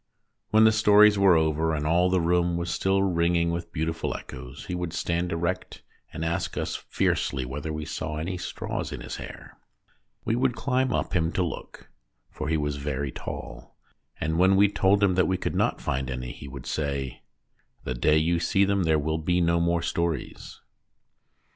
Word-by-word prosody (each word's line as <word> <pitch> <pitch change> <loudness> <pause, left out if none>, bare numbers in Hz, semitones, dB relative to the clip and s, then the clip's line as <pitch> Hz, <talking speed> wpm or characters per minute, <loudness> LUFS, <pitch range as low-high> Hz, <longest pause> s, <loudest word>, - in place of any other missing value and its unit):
When 110 +1 +5
the 110 - +7
stories 105 -1 +6
were 95 -3 +6
over, 80 0 +1
and 75 0 -2
all 85 +3 +3
the 95 0 +2
room 85 0 +2
was 85 0 -2
still 95 0 +1
ringing 85 -2 +2
with 85 0 -4
beautiful 80 0 -2
echoes, 65 +3 -10
he 90 - -5
would 90 -2 -3
stand 85 +1 -1
erect 85 +3 -3 0.3
and 80 - -4
ask 85 +1 -2
us - - -2
fiercely 65 -2 -1
whether 75 +5 -5
we 75 -1 -4
saw 75 0 -4
any 85 +4 -3
straws - - -4
in - - -6
his - - -6
hair. - - -10 0.7
We 115 - +1
would 125 0 +1
climb 130 -1 0
up - - -1
him 80 -2 +1
to 90 - +1
look 85 - -7 0.4
(for 75 - -4
he 80 - +2
was 75 -1 -2
very 70 -1 -3
tall), - - -8 0.4
and 80 +2 -1
when 95 +2 +5
we 100 +1 +5
told 100 0 +2
him 95 -2 +4
that 90 -2 +3
we 95 - +1
could - - -3
not - - +1
find 65 0 -2
any 65 -1 -4
he 70 - -10
would 65 -2 -9
say: 70 -4 -3 0.6
"The 65 - -3
day 75 +5 +3
you 85 +2 +2
see 95 +3 +2
them 100 -2 +1
there 80 -1 +3
will 80 +2 -1
be 90 +3 +1
no 85 0 +2
more 85 0 +1
stories." 85 -1 -3
85 Hz, 190 wpm, -26 LUFS, 75-95 Hz, 0.7 s, the